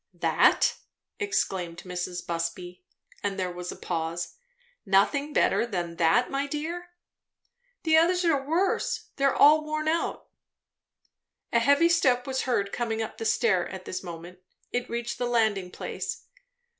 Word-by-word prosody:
"That?" - - +3 0.4
exclaimed 185 - -2
Mrs. 180 0 -4
Busby; 175 +2 -4 0.4
and 200 -1 -2
there 185 -1 -1
was 180 0 -6
a - - -7
pause. 170 0 -3 0.5
"Nothing 225 +9 +2
better - - +3
than 175 -7 -4
that, 170 +9 +3
my 275 +1 -1
dear?" 330 +5 -4 0.9
"The 320 -2 +4
others 355 +2 +3
are 285 -5 +2
worse. 335 +7 0
They 275 - +1
are 275 - +3
all 305 +1 +6
worn 310 0 -3
out." 330 +2 -1 1.3
A 235 - +5
heavy 285 +7 +4
step 255 -8 +3
was 265 -1 -2
heard 200 -5 +1
coming 225 -2 -2
up 220 - -8
the 225 - -4
stair 205 -5 +2
at 185 -1 -8
this 185 - -4
moment. 175 0 -9 0.3
It 245 0 -2
reached 235 0 -3
the 245 - 0
landing 220 -6 +1
place. - - -5
230 Hz, 145 wpm, -27 LUFS, 180-290 Hz, 1.3 s, all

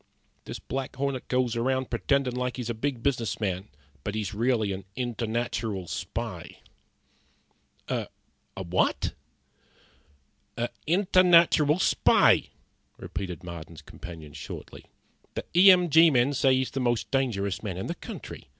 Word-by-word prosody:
This - - -6
Black 135 -1 -5
Hornet 135 -1 -2
goes 125 -2 +1
around 130 +2 0
pretendin' 130 +1 +1
like 125 -1 -2
he's 120 -2 -3
a - - -2
big 120 +1 -3
business 120 -7 0
man, 95 -2 -2 0.4
but 105 - -3
he's 105 -3 -3
really 110 -2 +1
a 95 0 -6
internatural 115 -5 -2
spy." - - -5 1.3
"A - - -2 0.5
what?" 90 -1 0 1.4
"A 120 +1 -1 0.2
internatural 175 -3 +5
spy," - - +4 0.5
repeated 90 -4 -6
Marden's 85 -2 -9
companion, 80 -4 -10
shortly. - - -9 0.5
"The - - -4
E 185 +3 +9
M 180 -1 +6
G 165 +1 +7
men 130 0 +3
say 135 -1 +3
he's 130 0 -1
the 135 - -3
most 120 -2 0
dangerous 105 -8 0
man 95 -5 -4
in 95 - -4
the - - -2
country. - - -9
120 Hz, 130 wpm, -27 LUFS, 100-135 Hz, 1.4 s, E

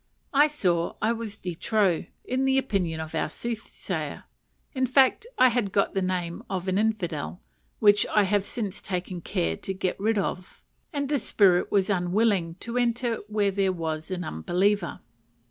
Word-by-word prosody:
I 290 +2 +6
saw 175 - 0
I 220 +2 +2
was 225 -2 -6
de 180 -4 -5
trop, 190 0 +1 0.2
in 260 +1 0
the 265 0 +3
opinion 190 -11 0
of 160 0 -6
our - - 0
soothsayer: 230 +5 -5 0.5
in 260 -2 +1
fact, 265 - +4
I 255 - +7
had 230 -5 0
got 200 - +1
the 195 - 0
name 180 -2 -2
of 185 -1 -3
an 190 +1 +1
infidel 180 - -1 0.4
(which 205 0 +5
I 210 - +3
have 200 0 +2
since 205 -2 -4
taken 180 -1 -4
care 80 - -1
to 195 - -4
get 185 -1 -2
rid 220 +2 +1
of), 185 -2 -3 0.3
and 285 -3 -2
the 290 0 +1
spirit 185 -7 +3
was 200 0 +2
unwilling 180 -2 +1
to 235 +1 -3
enter 240 -1 +1
where 210 -2 +1
there 195 -1 +1
was 160 -3 -4
an 180 -1 -3
unbeliever. 180 - 0
200 Hz, 170 wpm, -26 LUFS, 180-230 Hz, 0.5 s, I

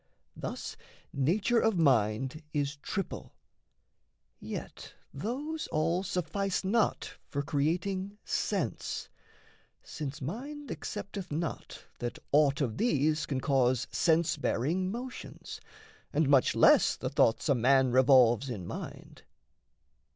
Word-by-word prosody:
Thus - - -5 0.4
nature 195 - +2
of 225 -4 +2
mind 130 -1 +2
is 145 0 -1
triple; 195 +6 -5 1.0
yet - - -7 0.2
those 280 - -4
all 165 +4 +1
Suffice 195 +1 -2
not 215 +4 0 0.2
for 140 0 -2
creating 185 +8 -1
sense - - -2 0.7
since 150 -1 -6
mind 265 - -6
Accepteth 200 -3 -6
not 160 +1 -4
that 120 0 -4
aught 145 0 +4
of 120 -4 -1
these 155 - +1
can 135 -3 -2
cause 130 -4 +2
Sense 165 -1 +2
bearing 160 +7 0
motions, 245 +3 -7 0.5
and 155 -1 +2
much 135 -2 +4
less - - +6
the - - -4
thoughts 115 - +2
A 140 - +5
man 130 +1 +4
revolves 130 -1 +5
in 100 -8 -5
mind. - - -8
155 Hz, 110 wpm, -30 LUFS, 135-195 Hz, 1.0 s, less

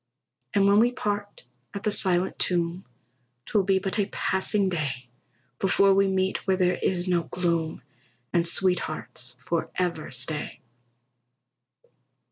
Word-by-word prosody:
And 200 -1 +4
when 200 +1 +5
we 240 +2 +4
part 205 -5 -4 0.3
at 200 - -5
the 210 - +1
silent 185 -2 0
tomb, 175 0 0 0.6
'Twill 210 - +2
be 195 0 +3
but 195 +2 -2
a 200 - +1
passing 195 +1 0
day 145 -8 -3 0.5
Before 195 0 +4
we 195 0 +3
meet 190 0 +1
where 190 -1 +3
there 180 -1 +1
is 180 -1 +1
no 175 -2 +2
gloom, 170 -3 -1 0.5
And 170 - +3
sweethearts 155 - 0
forever 170 +1 -2
stay. 135 +4 -2
185 Hz, 125 wpm, -26 LUFS, 170-195 Hz, 0.6 s, when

